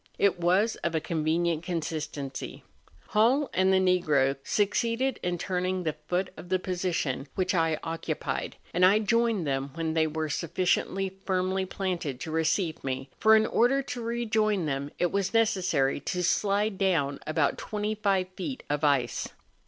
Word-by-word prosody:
It 190 -3 +2
was 185 +6 +2
of 170 -1 -2
a - - +3
convenient 160 +1 0
consistency. 155 -5 -4 0.5
Hall 250 +7 +3
and 190 +1 +3
the 190 - +5
Negro 170 -8 +3
succeeded 230 +5 0
in 175 0 -1
turning 185 +1 -1
the 155 -2 -1
foot 180 +1 -1
of 175 - -11
the 185 - +3
position 175 -7 -2
which 185 0 0
I 165 -3 +2
occupied, 165 0 -3 0.2
and 180 - +2
I 190 +3 +7
joined 225 -3 +1
them 135 -1 -1
when 165 -1 -2
they 160 -1 +2
were 155 0 -2
suffi¬ 170 +4 -2
ciently 190 +1 +1
firmly 190 0 0
planted 175 -9 -3
to 160 - -5
receive 160 +1 0
me, 135 0 -4
for 220 0 +6
in 220 0 +4
order 260 +5 +2
to 250 -2 -5
rejoin 220 -5 0
them 140 -1 -2
it 175 - +1
was 200 +2 -1
necessary 185 -12 +2
to 180 +5 -2
slide 200 +2 +1
down 160 -8 +1
about 155 -2 +1
25 210 -3 -1
feet 195 +8 -6
of 145 +1 -1
ice. 140 -5 +1
180 Hz, 160 wpm, -28 LUFS, 160-200 Hz, 0.5 s, I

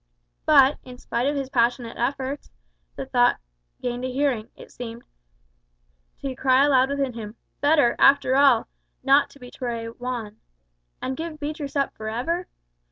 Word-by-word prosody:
But, 270 +2 +6
in 250 -1 -11
spite 245 +1 -2
of 290 - 0
his 270 -2 -3
passionate 235 -1 +1
efforts, 270 +3 -3 0.5
the - - -5
thought - - +3 0.4
gained 245 0 -3
a 255 - -2
hearing, 255 -5 0
it - - -14
seemed 235 -1 -8 1.2
to 270 -2 -3
cry 260 +2 +4
aloud 265 -2 +4
within 280 -2 -1
him, 220 -1 -8 0.2
"Better, 290 -4 +3
after 275 -1 +5
all, 270 -4 +5 0.4
not 275 +2 +4
to 280 - -18
betray 245 -2 -5
Juan!" 230 -2 -6 0.7
"And 260 - -2
give 330 +3 -5
up 305 - -15
Beatriz 295 -1 -4 0.2
forever? 245 +12 -3
260 Hz, 145 wpm, -24 LUFS, 240-280 Hz, 1.2 s, But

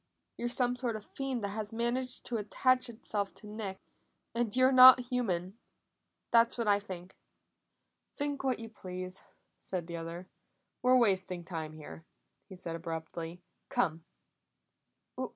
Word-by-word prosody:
You're 240 - -2
some 245 0 +2
sort 245 -2 -1
of 215 - -7
a - - -28
fiend 265 -4 -3
that 200 - -1
has 210 +1 -4
managed 240 +2 -1
to 240 - -2
attach 255 +4 +2
itself 210 -3 -3
to - - -11
Nick, 210 -3 -5 0.5
and 235 -2 0
you're 255 +1 +5
not 255 0 +10
human. 195 -4 -1 0.7
That's 230 +1 +5
what 230 -2 -1
I 205 -1 +5
think!" 185 -2 -9 1.0
"Think 285 -1 -2
what 260 -2 +1
you 230 - -7
please," 185 -3 -7 0.3
said 180 -3 -4
the 170 0 -5
other. 165 +2 -6 0.5
"We're 255 0 +5
wasting 190 -6 +1
time 160 -2 -5
here," 145 - -10 0.5
he 190 - -9
said 170 -2 -4
abruptly. 165 +1 -6 0.3
"Come." 165 -2 0
205 Hz, 145 wpm, -32 LUFS, 180-245 Hz, 1.0 s, not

